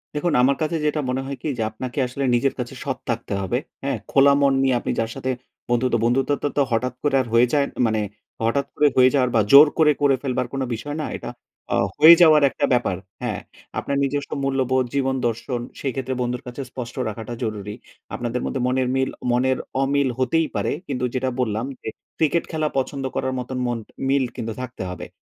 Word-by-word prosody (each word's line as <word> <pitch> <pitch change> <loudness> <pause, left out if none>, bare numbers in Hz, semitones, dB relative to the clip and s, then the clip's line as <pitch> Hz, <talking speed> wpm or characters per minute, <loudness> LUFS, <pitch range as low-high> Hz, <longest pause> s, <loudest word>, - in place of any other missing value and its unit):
দেখুন, 155 +1 0
আমার 135 +2 +4
কাছে 155 +2 0
যেটা 150 0 +1
মনে 130 +1 -1
হয় 140 0 -5
কি - - -4
যে, 110 - 0
আপনাকে 125 +4 -7
আসলে 135 +2 -4
নিজের 135 +3 +1
কাছে 125 +2 -4
সৎ 135 -2 -2
থাকতে 115 -3 -2
হবে, 120 +6 -1 0.3
হ্যা। 140 - -1 0.2
খোলা 140 0 +6
মন 140 -1 +4
নিয়ে 130 -2 +3
আপনি - - -3
যার 115 0 0
সাথে 130 -1 -2 0.4
বন্ধুত, 120 0 +1
বন্ধুত্ব 130 +4 +2 0.3
তো - - +5
হঠাৎ 125 +2 0
করে 140 -2 +3 0.2
হয়ে 120 +1 +5
যায় 140 -1 +3 0.2
মানে, 110 -1 +1 0.4
হঠাৎ 140 +5 +1
করে 150 - +4
হয়ে 130 0 +7
যাওয়ার 130 -3 +3
বা 110 - +5
জোর 145 +2 +10
করে, 155 -2 +5
করে 140 -2 +4
ফেলবার 125 -2 -1
কোন 135 - -2
বিষয় 145 +6 -6
না। - - -2
এটা - - -7 0.4
আ - - +3 0.2
হয়ে 165 +2 +10
যাওয়ার 155 -3 +7
একটা - - -1
ব্যাপার, 120 -7 +1 0.2
হ্যা। 120 -4 -1 0.5
আপনার 140 0 -2
নিজস্ব 140 +1 -2
মূল্যবোধ, 130 -1 +1
জীবন 135 -1 +1
দর্শন 120 +2 -3 0.2
সেই 135 - -1
ক্ষেত্রে 130 0 -2
বন্ধুর 125 +2 -2
কাছে 125 +3 -6
স্পষ্ট 120 -2 -7
রাখাটা 110 +2 -6
জরুরি। 105 -1 -4 0.4
আপনাদের 120 0 -3
মধ্যে 135 - -2
মনের 130 0 +1
মিল, 130 0 +1 0.2
মনের 130 +1 +2 0.2
অমিল 140 0 +2
হতেই 155 +5 +2
পারে। - - 0 0.2
কিন্তু 125 -3 -1
যেটা 130 0 0
বললাম 115 -1 0 0.2
যে, - - -9 0.3
ক্রিকেট 160 +1 +2
খেলা 155 -1 0
পছন্দ 135 +1 -2
করার 130 0 -1
মতন 125 +1 -5
মন 120 -1 -1 0.3
মিল 135 0 +3
কিন্তু 115 -3 -4
থাকতে 130 -5 -6
হবে। 90 - -7
130 Hz, 200 wpm, -22 LUFS, 120-140 Hz, 0.5 s, জোর